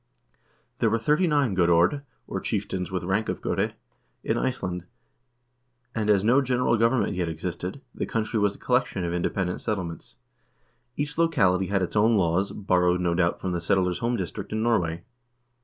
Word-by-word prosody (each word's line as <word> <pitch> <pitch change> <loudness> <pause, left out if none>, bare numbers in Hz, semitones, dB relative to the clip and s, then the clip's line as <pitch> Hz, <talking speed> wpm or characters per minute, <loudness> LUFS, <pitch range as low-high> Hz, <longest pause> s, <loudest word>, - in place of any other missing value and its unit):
There - - +3
were 115 - +2
thirty 150 +10 +2
nine 145 -8 +2
godord, 85 +8 +3 0.2
or - - -4
chieftains 90 -1 -3
with 90 -2 -2
rank 95 +5 0
of - - -2
gode, - - -1 0.5
in - - 0
Iceland, 90 -9 -2 1.1
and 110 -2 -1
as 100 -2 +4
no 125 +6 +4
general 125 -2 +1
government 115 +2 +2
yet 90 -2 -1
existed, 90 - -5
the - - -3
country 110 0 -1
was 100 -1 +1
a - - -14
collection 125 -7 0
of 85 - -2
independent 90 +1 -1
settlements. 90 -7 -4 0.8
Each 150 +2 -3
locality 100 - +3
had 100 -1 +1
its 90 - -4
own 110 +1 +4
laws, 90 +1 +1
borrowed, 90 -3 +2
no 90 -1 +1
doubt, 85 0 +1
from 95 - -3
the 85 -1 -2
settlers' 90 0 +1
home 120 +1 0
district - - -5
in 110 0 -1
Norway. 85 -8 +1
95 Hz, 170 wpm, -26 LUFS, 90-115 Hz, 1.1 s, as